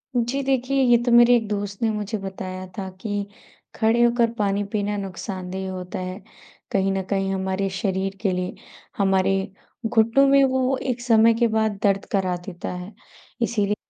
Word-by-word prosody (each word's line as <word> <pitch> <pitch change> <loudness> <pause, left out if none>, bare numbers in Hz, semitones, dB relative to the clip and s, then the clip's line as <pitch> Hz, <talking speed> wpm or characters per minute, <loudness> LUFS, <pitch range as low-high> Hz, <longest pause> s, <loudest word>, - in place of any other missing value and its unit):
जी 245 +4 0
देखिये, 265 0 +1
ये 240 -1 +6
तो 240 - +1
मेरे 240 +1 +7
एक 220 -2 -3
दोस्त 205 0 -4
ने 225 - +2
मुझे 210 +1 -3
बताया 185 -1 -6
था 190 -1 -4
कि 205 -2 -3 0.5
खड़े 225 +1 +2
होकर 235 -1 +3
पानी 200 -1 +1
पीना 205 -1 -1
नुकसानदेह 190 0 -5
होता 185 0 -6
है। 185 +2 -5 0.5
कहीं 195 0 +1
न 190 0 0
कहीं 195 -1 0
हमारे 190 +1 -1
शरीर 195 0 -2
के 195 -4 +1
लिए, 180 0 -3 0.4
हमारे 195 -1 +2 0.5
घुटनों 230 +4 +4
में 275 0 +6
वो 260 0 +1
एक 250 -2 -3
समय 230 -1 +5
के 235 - +4
बाद 220 -2 0
दर्द 200 -1 +2
करा 185 -2 +1
देता 175 -3 -6
है। 180 +3 -7 0.5
इसीलिए 210 -3 +1
205 Hz, 170 wpm, -23 LUFS, 190-235 Hz, 0.5 s, मेरे